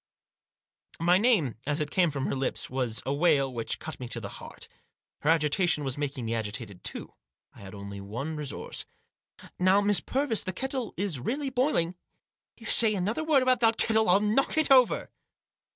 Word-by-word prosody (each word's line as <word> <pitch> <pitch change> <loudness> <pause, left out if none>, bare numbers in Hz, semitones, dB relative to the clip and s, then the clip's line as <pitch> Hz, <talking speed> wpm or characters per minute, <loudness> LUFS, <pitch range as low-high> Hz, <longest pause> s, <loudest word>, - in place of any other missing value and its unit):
My 175 +2 +4
name, 205 - +2
as 145 +1 0
it 150 -1 -3
came 180 -3 +3
from 140 -2 -3
her - - -1
lips, 135 -2 -2
was 125 -4 -1
a 135 - -1
wail 140 -4 +2
which 115 -2 -2
cut 160 - -8
me 125 - -6
to 115 - -1
the 100 -3 -7
heart. - - -10 0.5
Her 150 - -1
agitation 160 0 +2
was 135 -2 -2
making 140 -4 -4
me 115 - -2
agitated 110 -3 -5
too. - - -4 0.4
I - - -17
had 95 0 -10
only 100 0 -8
one 120 +11 -5
resource. 150 -3 -4 0.4
" - - -66 0.3
Now, 185 +2 +4
Miss 205 -1 +3
Purvis, 265 -5 0
this 185 -2 -5
kettle 265 -1 -4
is 185 -7 -2
really 270 - -3
boiling." 250 - +1 0.7
"If - - -24
you - - -11
say 220 -1 +5
another 205 - -1
word 300 -4 +3
about 255 0 +3
that 225 -1 +3
kettle 220 -3 +3
I'll 195 +3 +6
knock 215 +9 +1
it 310 -3 +3
over 255 -3 +4
165 Hz, 190 wpm, -28 LUFS, 135-225 Hz, 0.7 s, I'll